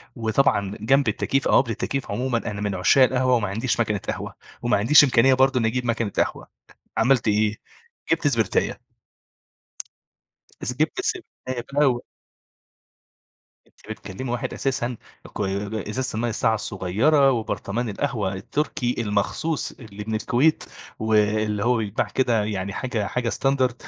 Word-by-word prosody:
وطبعًا 110 -4 +1
جنب 135 +4 +3
التكييف 135 0 0
أو - - +5
قبل 115 - -5
التكييف 135 +5 -3
عمومًا 125 -1 0
أنا 105 -3 -4
من 100 -2 -1
عشاق 100 +9 +5
القهوة 130 0 +2
وما 105 -4 0
عنديش 115 +5 -1
ماكينة 105 -3 +1
قهوة، - - -5 0.3
وما 120 -2 +2
عنديش 125 +9 +7
إمكانية 130 0 +4
برضو 130 0 +3
إنّي 110 - +1
أجيب 125 +2 -1
ماكينة 115 -3 -1
قهوة، - - -1 0.5
عملت 120 +1 +3
إيه؟ 105 0 +2 0.6
جبت 165 -2 +2
سبرتاية. 115 -7 0 2.0
جبت 160 - +1
السبرتاية 130 - -4
بقى 145 0 +4
و 120 -2 +1 1.6
أنتِ - - -18
بتكلمي 110 +3 -6
واحد 120 - -3
أساسًا 125 -2 -2 0.4
كوي 100 +2 -2
إزازة 130 +2 -2
المَيّة 115 +2 -1
الساقعة 110 0 +1
الصغيرة، 115 - +2
وبرطمان 115 0 -2
القهوة 105 -3 -2
التركي 125 +4 -2
المخصوص 115 +9 -1
اللي 105 -4 -10
من 110 - -1
الكويت، 125 +8 +2 0.3
واللي 105 -1 +1
هو 125 +1 +3
بيتباع 110 -2 -1
كده 120 -5 +1
يعني 100 -2 -3
حاجة 115 -5 -2
حاجة 125 -1 -2
standard 130 -3 +1
115 Hz, 140 wpm, -23 LUFS, 105-130 Hz, 2.0 s, عنديش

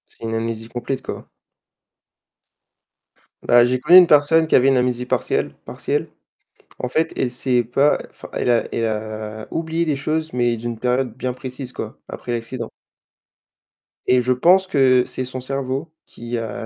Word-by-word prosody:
C'est - - -19
une 115 0 -2
amnésie 115 0 -3
complète, 125 +2 -4
quoi. - - -7 2.2
Bah 120 0 +6
j'ai 125 +1 0
connu 175 +8 +7
une 185 - +10
personne 155 +1 +4
qui 160 - +2
avait 130 - +5
une 135 -1 +4
amnésie 125 0 0
partielle - - -1
partielle. - - -2 0.7
En 125 - -3
fait, 160 +5 0
elle 130 - 0
s'est 125 0 0
pas 135 +5 +2
enfin, - - -12
elle - - -1
a 120 -1 +3
elle 115 - 0
a, 110 0 -5
heu, - - -11
oublié 165 +1 -1
des 155 -3 0
choses, 155 +3 -2
mais 120 -1 +1
d'une 115 0 -5
période 125 -1 0
bien 130 0 -3
précise 130 0 -7
quoi, 110 -3 -6
après 120 - -7
l'accident. 115 0 -4 1.4
Et 125 0 +4
je 125 +1 +2
pense 180 +9 +4
que 130 -6 +4
c'est 130 - -5
son 130 0 -6
cerveau 135 +4 -4
qui 120 +1 -6
a 115 0 -5
125 Hz, 170 wpm, -21 LUFS, 120-140 Hz, 2.2 s, une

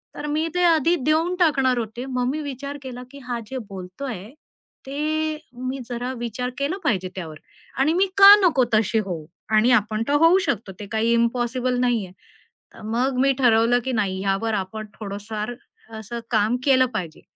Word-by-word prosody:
तर 290 - -6
मी 315 +2 0
ते 360 - +2
आधी 335 0 +4
देऊन 325 +4 +2
टाकणार 270 -7 +3
होते 235 +2 -4
मग 250 -2 -1
मी 310 - -3
विचार 280 0 -6
केला, 250 -2 -8
की 280 - -11
हा 240 -1 -2
जे 265 - -5
बोलतोय 190 +3 -7 0.6
ते 310 +2 -1 0.3
मी 265 +1 -3
जरा 245 +1 -3
विचार 240 +1 -3
केला 285 +7 -1
पाहिजे 190 - 0
त्यावर 160 -5 -7 0.4
आणि 300 +4 +3
मी 380 +3 +3
का 400 +1 +11
नको 290 -8 +3
तशी 215 +1 +2
होऊ 165 -5 -5 0.3
आणि 230 +4 +4
आपण 215 +2 -3
तर 285 - +1
होऊ 350 +3 +6
शकतो 205 -3 -2
ते 205 - -6
काही 225 +1 +1
इम्पॉसिबल 245 +2 0
नाहीये 235 -7 0 0.6
तर - - -14
मग 250 +4 0
मी 275 +1 +4
ठरवलं, 240 -1 +4
की 260 - -1
नाही 195 -4 -1
यावर 195 +3 0
आपण 210 +2 -4
थोडंफार 210 +2 -5 0.4
असं 220 +2 -7
अ, - - -3
काम 220 +2 +2
केलं 260 -2 +5
पाहिजे 170 -6 -5
245 Hz, 175 wpm, -23 LUFS, 215-280 Hz, 0.6 s, का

